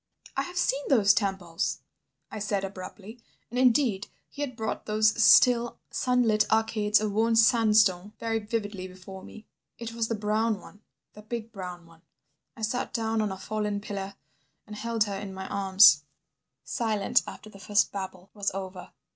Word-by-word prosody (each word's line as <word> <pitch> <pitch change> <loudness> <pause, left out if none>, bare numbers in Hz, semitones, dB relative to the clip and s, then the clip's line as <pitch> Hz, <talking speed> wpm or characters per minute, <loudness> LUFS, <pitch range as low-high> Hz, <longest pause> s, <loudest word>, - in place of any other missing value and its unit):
"I - - +1
have 360 0 -7
seen 280 -5 +1
those 210 -7 +5
temples," 190 -5 -2 0.5
I 215 - -6
said 205 -1 -1
abruptly, 195 +4 -9 0.3
and 250 - -2
indeed 240 -5 +3 0.2
he 290 - -8
had 265 -4 -3
brought 220 -1 -4
those 215 0 +3
still, 240 -1 +5
sunlit 235 -4 +1
arcades 220 -1 +2
of 215 -1 -2
worn 225 +2 +2
sandstone 215 -4 +4
very 225 -1 -1
vividly 205 -3 -4
before 185 +1 -11
me. 220 - -12 0.3
"It 230 -1 -7
was 230 -1 -1
the 230 - -1
brown 215 +1 0
one, 205 +3 -16 0.3
the 210 - -12
big 225 +1 -6
brown 180 -4 -8
one. 165 -1 -20 0.6
I 225 - -9
sat 245 +4 -2
down 225 -1 0
on 210 -2 -1
a 190 - -5
fallen 210 +1 -3
pillar 200 -1 -6 0.5
and 210 - -9
held 230 0 0
her 205 -2 -4
in 195 -1 -7
my 190 0 -6
arms... 190 -6 +6 0.6
Silent 220 -5 +1
after 215 - -10
the 195 - -14
first 205 +2 +1
babble 190 -1 -7
was 205 -1 -1
over. 190 -1 -7
210 Hz, 165 wpm, -27 LUFS, 195-225 Hz, 0.6 s, arms